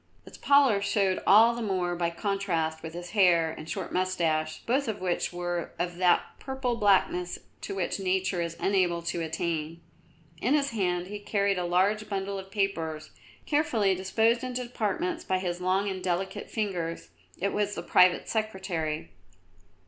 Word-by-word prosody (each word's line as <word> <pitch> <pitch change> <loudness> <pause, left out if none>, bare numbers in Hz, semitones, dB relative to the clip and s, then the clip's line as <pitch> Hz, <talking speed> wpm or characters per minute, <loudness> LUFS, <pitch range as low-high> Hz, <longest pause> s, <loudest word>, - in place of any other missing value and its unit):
Its - - -12
pallor 275 -8 +4
showed 200 -2 +1
all 225 +4 +7
the 235 - -5
more 185 -5 -1
by 170 -1 0
contrast 170 -4 -1
with 160 0 -7
his 175 0 -7
hair 175 -6 +4
and 160 0 -9
short 190 -4 -4
moustache, 165 -4 0
both 265 +3 +1
of 220 -2 -3
which 180 -1 -1
were 175 -1 -3
of 175 0 -3
that 180 -1 +4 0.2
purple 265 -2 -2
blackness 190 -4 +2 0.2
to - - -5
which 190 +1 -2
Nature 185 -1 0
is 170 0 -4
unable 180 -3 +1
to 170 0 -2
attain. 165 0 -3 0.6
In 260 +6 +3
his 280 -3 +1
hand 180 -5 0
he 205 +2 -6
carried 200 -2 0
a 180 - -1
large 195 +5 +1
bundle 195 0 -2
of 190 0 -10
papers, 165 -6 -2 0.3
carefully 240 -10 +2
disposed 220 +6 +1
into 250 0 -3
departments 285 - -2
by 185 - 0
his 180 -1 -3
long 190 +2 +1
and 190 -2 -4
delicate 185 +1 -2
fingers. 175 - -3 0.3
It 200 +2 -1
was 205 0 0
the 170 - -5
Private 180 +1 +4
Secretary. 185 - -2
190 Hz, 165 wpm, -28 LUFS, 175-210 Hz, 0.6 s, all